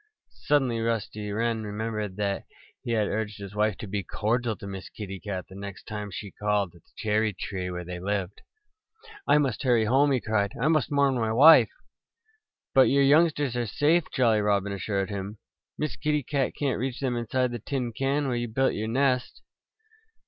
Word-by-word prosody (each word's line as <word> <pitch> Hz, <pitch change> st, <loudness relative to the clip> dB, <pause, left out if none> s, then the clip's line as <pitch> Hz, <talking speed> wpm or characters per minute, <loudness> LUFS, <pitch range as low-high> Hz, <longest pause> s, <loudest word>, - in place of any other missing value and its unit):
Suddenly 135 Hz, -6 st, +2 dB
Rusty 110 Hz, -2 st, -2 dB
Wren 115 Hz, +1 st, 0 dB
remembered 105 Hz, -1 st, -4 dB
that 100 Hz, -1 st, -2 dB, 0.4 s
he 120 Hz, -, -2 dB
had 110 Hz, -2 st, +2 dB
urged 105 Hz, -1 st, -3 dB
his 100 Hz, -1 st, -8 dB
wife 105 Hz, -1 st, +1 dB
to 115 Hz, -, -7 dB
be 100 Hz, 0 st, -2 dB
cordial 110 Hz, +5 st, -1 dB
to -, -, -11 dB
Miss 95 Hz, -2 st, -7 dB
Kitty 100 Hz, -3 st, -7 dB
Cat 95 Hz, -2 st, -5 dB
the -, -, -14 dB
next 100 Hz, 0 st, -8 dB
time 105 Hz, -1 st, -5 dB
she 100 Hz, 0 st, -7 dB
called 105 Hz, -4 st, -1 dB
at 85 Hz, -, -18 dB
the -, -, -30 dB
cherry 110 Hz, 0 st, +1 dB
tree 95 Hz, -1 st, -4 dB
where 90 Hz, -1 st, -5 dB
they 90 Hz, 0 st, -6 dB
lived. 100 Hz, 0 st, -3 dB, 0.9 s
"I -, -, +6 dB
must 135 Hz, -6 st, 0 dB
hurry 120 Hz, -5 st, +3 dB
home!" 135 Hz, +5 st, +3 dB
he 130 Hz, -, +2 dB
cried. 105 Hz, -3 st, 0 dB
"I 140 Hz, +6 st, +2 dB
must 155 Hz, -4 st, +2 dB
warn 140 Hz, -1 st, +3 dB
my 115 Hz, -3 st, 0 dB
wife." 150 Hz, +8 st, +8 dB, 1.0 s
"But 135 Hz, -1 st, +6 dB
your 140 Hz, 0 st, +4 dB
youngsters 145 Hz, -2 st, +3 dB
are 120 Hz, -1 st, -1 dB
safe," 155 Hz, +9 st, +2 dB
Jolly 115 Hz, -5 st, +3 dB
Robin 100 Hz, -1 st, +1 dB
assured 100 Hz, 0 st, -2 dB
him. 100 Hz, +1 st, -5 dB, 0.4 s
"Miss 150 Hz, -1 st, -2 dB
Kitty 150 Hz, -1 st, 0 dB
Cat 135 Hz, 0 st, -1 dB
can't 135 Hz, -6 st, 0 dB
reach 130 Hz, +1 st, -3 dB
them 130 Hz, -3 st, -1 dB
inside 120 Hz, +2 st, 0 dB
the 120 Hz, -, -4 dB
tin 125 Hz, 0 st, -3 dB
can 135 Hz, +4 st, 0 dB
where 125 Hz, -, 0 dB
you 120 Hz, 0 st, -2 dB
built 130 Hz, +4 st, +1 dB
your 110 Hz, +1 st, -3 dB
nest." 130 Hz, +1 st, 0 dB
110 Hz, 190 wpm, -27 LUFS, 100-130 Hz, 1.0 s, wife